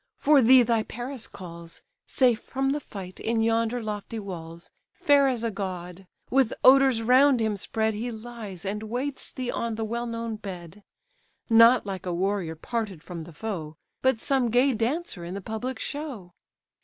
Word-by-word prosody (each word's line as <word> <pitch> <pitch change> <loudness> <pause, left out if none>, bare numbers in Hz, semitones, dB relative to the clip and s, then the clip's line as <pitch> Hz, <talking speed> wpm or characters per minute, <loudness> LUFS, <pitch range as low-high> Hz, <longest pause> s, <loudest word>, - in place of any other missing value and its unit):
for 290 -1 +5
thee 255 +1 +7
thy 230 -1 +2
Paris 240 +2 -5
calls, 170 -2 -9 0.2
Safe 245 -4 +3
from 270 0 -1
the 295 - 0
fight, 190 -8 -9
in 230 0 0
yonder 230 +1 +1
lofty 215 +1 -5
walls, 170 -5 -8 0.2
Fair 285 -1 +4
as 245 -3 -1
a 230 - 0
god; 185 -2 -6 0.2
with 260 -3 +3
odours 265 -3 +6
round 255 +2 +5
him 220 -2 0
spread, 220 +2 -1
He 225 +4 -3
lies, 220 -5 -8
and 205 +2 -2
waits 250 +6 -4
thee 255 -1 -3
on 230 -1 -2
the 220 0 -2
well 235 +2 -3
known 230 -1 -4
bed; 185 -2 -9 0.7
Not 230 +2 +7
like 190 -2 -5
a 180 - -1
warrior 185 -3 -1
parted 200 -1 -4
from 170 -3 -7
the 170 - -11
foe, 160 -4 -5 0.3
But 260 -3 +2
some 265 -2 +1
gay 250 +4 +3
dancer 235 - -2
in 175 +2 -6
the - - -3
public 220 +5 -4
show." 255 - -6
225 Hz, 170 wpm, -26 LUFS, 195-245 Hz, 0.7 s, thee